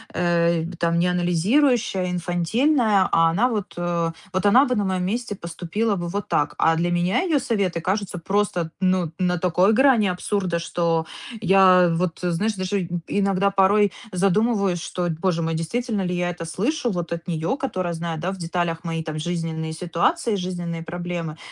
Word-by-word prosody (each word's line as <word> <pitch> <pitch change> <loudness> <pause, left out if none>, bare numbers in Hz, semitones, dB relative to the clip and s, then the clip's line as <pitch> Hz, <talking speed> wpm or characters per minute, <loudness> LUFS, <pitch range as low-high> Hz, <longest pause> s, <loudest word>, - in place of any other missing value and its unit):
э, 170 -1 +1
там 170 0 +1
не 175 - +2
анализирующая, 185 - +1
инфантильная, 195 - +2
а 165 0 +4
она 210 +9 +2
вот, 210 -8 -3
э, 170 -1 -1 0.2
вот 185 +2 -1
она 245 +7 +6
бы 250 -2 0
на 210 - 0
моем 185 -1 -1
месте 230 +2 -2
поступила 180 +5 -2
бы 175 -2 -4
вот 200 +2 -4
так. 145 0 0
А 165 - +4
для 175 +2 0
меня 175 +2 +1
её 335 -6 +1
советы 195 -9 -1
кажутся 190 0 -2
просто, 185 -2 -1
ну, 185 -3 +1
на 180 -1 +1
такой 180 +4 +3
грани 250 -3 +4
абсурда, 180 -1 -1
что 170 -1 0 0.4
я 185 -2 +5
вот, 175 -1 -2
знаешь, 180 +5 0
даже 190 +1 -1
и 175 - -6 0.3
иногда 195 0 +2
порой 200 +1 +3 0.2
задумываюсь, 195 0 +1
что 175 +1 -3
д 160 - -2
Боже 180 -3 +1
мой, 165 0 -1
действительно 210 +6 -2
ли 180 0 -2
я 175 0 -1
это 175 -1 -6
слышу 240 - -1
вот 175 -3 -4
от 170 +1 -7
неё, 165 - -1
которая 185 -11 -2
знает, 165 -1 -4
да, 180 +4 -2
в 190 - -7
деталях 170 -1 -2
мои 165 -1 -3
там 155 -1 -5
жизненные 160 -1 -3
ситуации, 180 - 0
жизненные 175 -3 -4
проблемы? 170 -2 -5
180 Hz, 175 wpm, -23 LUFS, 170-200 Hz, 0.4 s, она